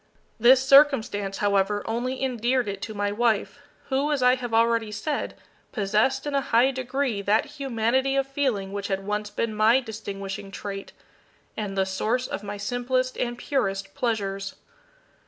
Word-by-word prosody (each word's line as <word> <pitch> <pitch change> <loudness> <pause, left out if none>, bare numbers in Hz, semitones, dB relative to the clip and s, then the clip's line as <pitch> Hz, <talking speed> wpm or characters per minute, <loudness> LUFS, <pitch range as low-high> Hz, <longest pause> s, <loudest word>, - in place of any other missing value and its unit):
This 255 +3 +6
circumstance, 260 -9 +4
however, 205 0 +1
only 250 +4 -2
endeared 250 -1 0
it 195 -1 -4
to 220 - -6
my 205 0 -1
wife, 225 +4 0 0.3
who, 275 +2 +1
as 280 -4 0
I 250 0 +6
have 250 -2 -4
already 230 -1 +2
said, 280 +8 -3 0.4
possessed 215 +6 +1
in 290 - -3
a 275 - +2
high 250 +1 +3
degree 260 -3 -2
that 205 +5 +2
humanity 265 -2 0
of 275 0 +2
feeling 260 -9 -1
which 200 0 -3
had 195 0 -2
once 210 0 -2
been 225 +1 -2
my 220 +4 +4
distinguishing 200 -4 -6
trait, 195 0 -6 0.6
and 200 -2 -4
the 190 - +3
source 220 +6 -1
of - - -4
my 205 0 -6
simplest 245 +4 -1
and 240 -1 -2
purest 195 -8 -2
pleasures. 195 -4 -2
230 Hz, 155 wpm, -25 LUFS, 205-260 Hz, 0.6 s, This